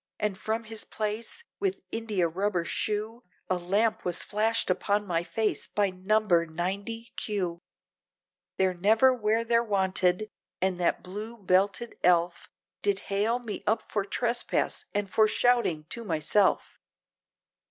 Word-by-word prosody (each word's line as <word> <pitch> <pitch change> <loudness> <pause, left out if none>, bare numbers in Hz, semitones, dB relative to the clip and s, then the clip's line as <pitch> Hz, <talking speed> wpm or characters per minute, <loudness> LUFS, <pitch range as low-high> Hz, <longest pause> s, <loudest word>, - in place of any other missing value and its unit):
and 210 -2 0
from 220 +3 -2
his 220 0 -5
place, 220 - -3 0.2
with 390 -1 -1
india 215 -6 0
rubber 180 +1 -1
shoe, 215 +6 -1 0.3
A - - +4
lamp 205 +6 +1
was 175 -1 +1
flashed 220 -1 +1
upon 205 +3 0
my 170 -3 0
face, 210 +6 -1
by 205 -2 +1
number 185 -1 +2
90, 200 +8 -4
Q, 185 -5 -2 1.0
They're 190 -1 +2
never 220 +8 +4
where 225 -1 +1
they're 235 0 +3
wanted, 190 -1 +1 0.3
and 185 -1 0
that 175 - +1
blue, 210 +5 -6
belted 195 +3 +1
elf, 175 -1 +2 0.3
Did 200 -1 +1
hail 215 +4 +2
me 235 -4 -6
up 220 +1 0
for 205 - 0
trespass, 240 - -1
and 205 -1 -1
for 215 +3 +4
shouting 235 -9 +2
to 235 - -4
myself! 185 +2 +1
205 Hz, 135 wpm, -28 LUFS, 185-225 Hz, 1.0 s, A